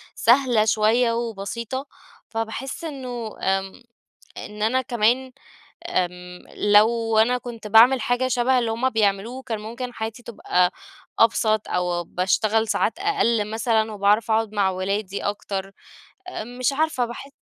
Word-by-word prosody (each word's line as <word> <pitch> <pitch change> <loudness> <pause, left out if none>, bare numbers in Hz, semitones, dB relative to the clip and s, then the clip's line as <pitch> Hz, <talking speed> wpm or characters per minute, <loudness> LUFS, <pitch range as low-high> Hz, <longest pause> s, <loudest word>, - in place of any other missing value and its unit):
سهلة 240 -3 +3
شوية 220 +3 +3
وبسيطة، 235 +3 -4 0.4
فباحس 225 +7 -5
إنه 250 -7 -6
آمم، 195 +4 -2 0.5
إن 210 0 -8
أنا 255 +4 +2
كمان 245 +2 +1 0.6
آمم، 180 - -3
لو 220 +2 +3
أنا 245 +3 +3
كنت 235 -3 -9
باعمل 235 +5 +6
حاجة 245 +3 0
شبه 255 +1 +2
اللي 235 -2 0
هم 235 +4 0
بيعملوه، 220 +3 0
كان 225 -4 -4
ممكن 235 +3 -6
حياتي 220 +2 -5
تبقى 180 -6 0 0.5
أبسط 220 -1 +2
أو 175 -1 -1
باشتغل 215 +6 0
ساعات 225 +6 0
أقل 235 - +1
مثلًا، 220 0 0
وباعرف 210 +2 +2
أقعد 220 -1 +1
مع 200 -2 +2
ولادي 195 +1 -3
أكتر. 195 -1 -4 0.6
آمم، 245 -7 -7
مش 255 +2 +1
عارفة 300 -4 0
باح 240 +3 -8
225 Hz, 130 wpm, -23 LUFS, 205-245 Hz, 0.6 s, باعمل